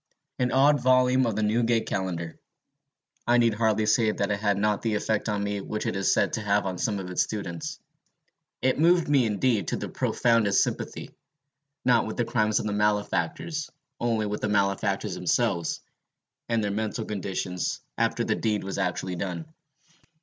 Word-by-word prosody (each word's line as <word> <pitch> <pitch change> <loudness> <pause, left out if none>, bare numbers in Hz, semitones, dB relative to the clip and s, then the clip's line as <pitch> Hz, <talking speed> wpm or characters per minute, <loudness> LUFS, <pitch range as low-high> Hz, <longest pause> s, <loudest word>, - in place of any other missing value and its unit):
An 125 -1 +1
odd 140 +3 +4
volume 130 0 +4
of 110 - -1
the 110 - 0
Newgate 115 +1 +2
Calendar. 85 -4 -3 0.9
I 120 0 +5
need 115 -2 +4
hardly 110 -1 +1
say 110 +1 +3
that 100 -1 -1
it 105 - -1
had 100 -2 +1
not 105 0 +1
the 110 -2 0
effect 110 +1 -1
on 100 -1 -1
me 100 0 -2
which 105 +2 -4
it - - -1
is 95 -1 +2
said - - +2
to - - -1
have 105 -1 +1
on 95 -2 -3
some 105 -2 0
of 90 -2 -6
its 90 - +1
students: 85 -6 -4 0.8
it 130 +2 +2
moved 170 +1 +4
me, 140 -5 +3
indeed, 110 -2 +1
to - - -1
the - - -5
profoundest 115 -4 +2
sympathy, - - -5 0.7
not 120 -3 +4
with 110 - -5
the 120 - +1
crimes 110 -2 +1
of - - -4
the 105 - -1
malefactors, 105 +10 -1 0.3
only 115 -2 0
with 105 0 -3
the 105 - -1
malefactors 100 -1 0
themselves, 85 -2 0 0.7
and 115 -2 +1
their 100 - -1
mental 110 +2 -2
condition 95 -3 -4 0.4
after - - 0
the - - +1
deed 105 -2 -1
was 95 - -4
actually 90 +1 -2
done. 95 - -4
105 Hz, 180 wpm, -26 LUFS, 100-120 Hz, 0.9 s, I